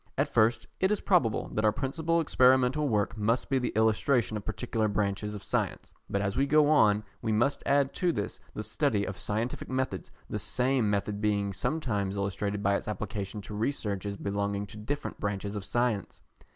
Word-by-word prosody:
At - - +2
first 110 +1 +3
it 190 - +3
is 210 - +1
probable 165 - +2
that 105 - -1
our 110 - +5
principal 160 +8 0
experimental 130 0 +4
work 105 0 +1
must 115 +4 0
be 135 - +3
the 125 - -1
illustration 110 +2 +2
of 105 - -4
particular 110 0 -1
branches 105 0 -1
of 100 - -8
science, - - -2 0.2
but 100 0 0
as 100 0 -1
we 140 +1 +2
go 150 +1 +5
on 105 -8 +4 0.2
we 110 - -1
must 120 +6 +2
add 140 -1 +3
to 180 -1 +1
this - - -3 0.2
the 105 - -3
study 105 -1 0
of 95 - -4
scientific 110 +4 -2
methods, 130 0 -2 0.2
the - - -3
same 125 -3 +1
method 105 0 -1
being 100 -2 +1
sometimes 105 -4 -1
illustrated 100 +1 -2
by 100 0 +3
its - - -9
application 105 -1 -4
to 105 - -9
researches 105 -4 -2
belonging 100 0 -2
to 100 - -13
different 145 +8 -4
branches 100 0 -2
of 100 - -4
science. 115 0 -1
110 Hz, 185 wpm, -29 LUFS, 100-130 Hz, 0.2 s, our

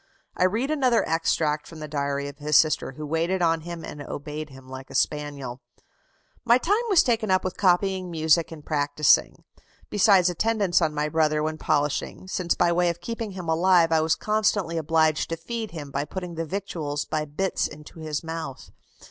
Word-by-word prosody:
I 180 - +2
read 230 +10 0
another 260 -6 +2
extract 160 -2 0
from 165 - -11
the 155 - -6
diary 140 -1 -2
of 140 0 -10
his 150 0 +3
sister, 155 -3 +2
who 150 +3 -7
waited 165 +4 0
on 165 -1 +2
him 170 0 -7
and 145 - -8
obeyed 150 +2 -6
him 135 -1 -14
like 130 0 -9
a - - -9
spaniel: 140 -4 -2 0.8
"My 240 0 +5
time 405 - +1
was 385 -5 +6
taken 230 -4 0
up 185 0 +3
with 185 - -3
copying 185 0 +1
music 160 0 +2
and 155 -2 -10
practising, 145 -1 +2 0.5
besides 200 -3 +5
attendance 200 0 +1
on 155 -2 0
my 150 0 0
brother 155 -1 +1
when 155 0 -3
polishing, 150 +4 -1
since 180 -2 -1
by 175 -1 +2
way 175 0 +2
of 170 0 -3
keeping 225 +2 -5
him 180 -3 -7
alive 170 0 +4
I 160 -1 +4
was 160 0 +2
constantly 210 -5 0
obliged 160 0 +1
to 165 - -3
feed 225 +5 -5
him 150 -4 -8
by 140 +1 -2
putting 180 +2 -6
the 165 0 -3
victuals 155 -5 -3
by 155 -1 -2
bits 170 +6 -1
into 150 +2 -13
his 155 -1 -4
mouth. 165 -4 -6
165 Hz, 190 wpm, -25 LUFS, 150-185 Hz, 0.8 s, was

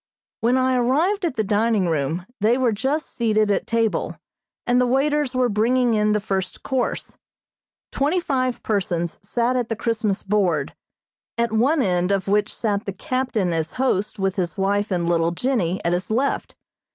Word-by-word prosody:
When 240 +3 +2
I 260 0 +2
arrived 325 +11 +1
at 320 - -2
the 220 - 0
dining 210 -1 +1
room 160 +2 -1
they 220 +4 +3
were 255 -3 +2
just 265 +9 -1
seated 215 -3 +1
at - - 0
table, 230 -2 0 0.5
and 245 +1 +3
the 250 - +2
waiters 275 +1 +1
were 255 -1 +3
bringing 240 +3 +2
in 210 -1 +2
the 210 - +2
first 190 -3 -3
course. 260 -2 -2 0.7
Twenty 300 +7 +1
five 255 -7 -1
persons 175 -5 -1
sat 235 +5 0
at 245 -2 -1
the 225 - -1
Christmas 220 -3 -1
board, 185 -8 0 0.6
at 235 -1 +1
one 260 +7 +2
end 180 0 +1
of 195 -1 0
which 205 +1 +1
sat 210 -2 -2
the 195 - -4
captain 250 - -1
as 160 -1 -2
host 215 -5 0
with 195 0 -1
his 175 -1 -2
wife 200 +2 0
and 175 -3 -1
little 165 -1 +2
Jennie 190 -5 0
at 170 - +2
his 180 +2 -2
left. 255 +6 -1
220 Hz, 175 wpm, -22 LUFS, 195-255 Hz, 0.7 s, they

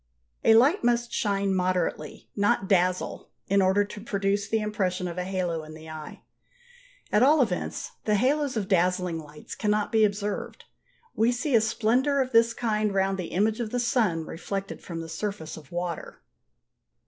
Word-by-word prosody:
A 225 - +6
light 275 - +4
must 240 0 +1
shine 200 -2 0
moderately, 180 -4 -1
not 200 -1 +1
dazzle, 185 -2 +1 0.2
in 200 0 +3
order 190 +2 +3
to 205 0 -9
produce 200 -1 -1
the 225 - +1
impression 190 -4 -1
of 175 +1 -5
a - - -1
halo 180 -4 -2
in 155 0 -10
the 160 0 -10
eye; 155 -1 -9 0.9
at 210 - +4
all 295 +5 +6
events 220 -9 -1
the 210 - +2
halos 270 +3 +1
of 200 -3 -2
dazzling 180 -2 +1
lights 150 -1 -10
cannot 210 -1 0
be 220 -1 +4
observed. 205 0 -2 0.5
We 225 +2 +3
see 250 +4 -2
a 230 - +6
splendour 240 +6 +1
of 260 -1 0
this 230 -1 +4
kind 215 -3 0
round 195 0 0
the 180 - -2
image 210 +6 0
of 235 -3 -2
the 245 - -1
sun 220 - +1
reflected 195 +5 -5
from 165 -2 -6
the 165 - -7
surface 165 0 -4
of 150 -4 -13
water. 175 -1 -4
200 Hz, 170 wpm, -26 LUFS, 180-225 Hz, 0.9 s, A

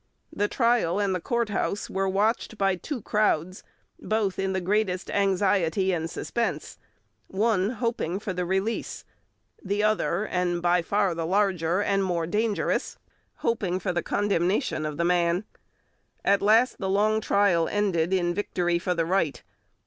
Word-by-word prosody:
The 205 - 0
trial 230 -7 +1
and 200 -2 +1
the 180 - -2
courthouse 215 -3 -1
were 195 0 -1
watched 215 +3 0
by 195 -2 +2
two 240 - -6
crowds, 185 -4 0 0.4
both 215 -4 -1
in 195 0 0
the 190 - 0
greatest 190 0 -1
anxiety 195 -2 +1
and 165 -1 -2
suspense, 235 +6 -3 0.5
one 200 -1 +1
hoping 230 -7 -2
for 200 -1 -4
the 180 0 -2
release, 190 +5 -2 0.6
the 205 +2 -1
other, 215 -2 +1
and 180 -3 -1
by 175 0 +2
far 200 +1 +1
the 165 -1 -3
larger 185 -1 +1
and 195 -1 +1
more 175 -3 -1
dangerous, 210 +4 -1 0.5
hoping 200 -6 0
for 190 -1 -2
the 175 - 0
condemnation 190 - 0
of 150 - -6
the 170 - 0
man. 175 +1 +2 0.8
At 200 0 +3
last 225 +5 +3
the 190 - -2
long 215 +3 +2
trial 195 -6 +2
ended 190 -5 0
in 175 -2 +1
victory 175 -3 -1
for 180 0 -1
the 165 -1 0
right. 170 -4 0
195 Hz, 150 wpm, -26 LUFS, 175-210 Hz, 0.8 s, At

